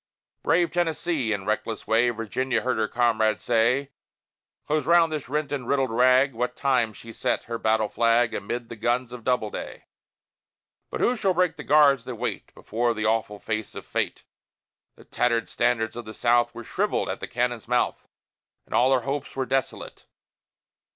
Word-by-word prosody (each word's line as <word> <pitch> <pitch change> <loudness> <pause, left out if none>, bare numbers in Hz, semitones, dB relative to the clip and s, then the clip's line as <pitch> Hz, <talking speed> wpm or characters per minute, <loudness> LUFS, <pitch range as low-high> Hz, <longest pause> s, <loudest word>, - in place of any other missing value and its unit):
Brave 175 0 +2
Tennessee! 165 -7 0
In 100 -2 -2
reckless 110 +1 -2
way 115 +2 +3
Virginia 120 +3 -1
heard 130 -2 -1
her 110 - +1
comrade 110 -4 +1
say: 125 +6 +1 0.7
"Close 155 0 -1
round 170 -1 +5
this 150 -5 -4
rent 150 +1 -2
and 135 -4 -3
riddled 135 -3 +1
rag!" 130 +3 +4
What 125 +2 -2
time 125 -5 +1
she 115 +1 -12
set - - -1
her 115 0 -5
battle 110 -1 +2
flag 115 +2 +2
Amid 120 +4 -4
the 120 - -7
guns 120 +2 -1
of 125 -2 -9
Doubleday. 120 -4 -2 1.0
But - - -4
who 250 - +3
shall 195 -5 0
break 180 -1 +2
the - - -8
guards 140 -4 +4
that 125 -1 -5
wait 120 +2 -4
Before 120 +2 -1
the 110 0 -2
awful 110 -1 0
face 110 +1 -4
of - - -8
Fate? - - -2 0.7
The - - -16
tattered 115 -2 0
standards 120 -2 0
of 120 -1 -6
the 110 0 -9
South 120 0 +2
Were 120 - -7
shrivelled - - -1
at - - -4
the - - -5
cannon's 120 -2 -2
mouth, 125 +1 0 0.6
And - - -10
all 130 +2 +4
her 130 - +2
hopes 135 +3 -4
were 135 -1 -1
desolate. 135 +2 -3
120 Hz, 175 wpm, -25 LUFS, 115-135 Hz, 1.0 s, round